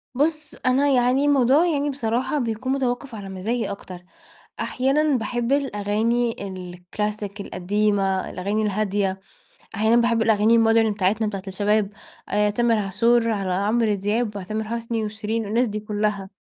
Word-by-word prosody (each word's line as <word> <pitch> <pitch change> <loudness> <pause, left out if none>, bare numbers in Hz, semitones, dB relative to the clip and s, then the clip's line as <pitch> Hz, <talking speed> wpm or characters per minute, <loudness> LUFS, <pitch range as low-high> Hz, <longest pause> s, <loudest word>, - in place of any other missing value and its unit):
بُص 305 +2 -1
أنا 260 +3 +3
يعني 255 +1 +3
الموضوع 280 +2 +4
يعني 290 -3 0
بصراحة 255 +2 -1
بيكون 235 +1 -2
متوقف 260 -1 -2
على 200 -2 -7
مزاجي 205 +5 -2
أكتر. 185 -2 -8 0.6
أحيانًا 275 +2 +1
باحب 240 +2 -2
الأغاني 230 -3 0
الكلاسيك 195 +3 -5
القديمة، 195 0 0
الأغاني 200 +4 -2
الهادية، 200 -2 0 0.6
أحيانا 220 +2 +3
باحب 235 -1 +2
الأغاني 220 +1 +4
الmodern 225 -1 +4
بتاعتنا 205 +2 +1
بتاعة 195 -2 -4
الشباب، 205 +2 +1 0.4
آآ، 210 +1 +2
تامر 230 +2 +2
عاشور، 230 +4 +2
على 195 -4 -1
عمرو 210 +3 +1
دياب، 205 +2 -1
علي 190 - -6
تامر 215 +2 -3
حسني 230 0 -3
وشيرين، 215 +1 -3
الناس 230 +5 +1
دي 215 0 -3
كلها. 210 -2 -2
220 Hz, 140 wpm, -23 LUFS, 205-240 Hz, 0.6 s, الموضوع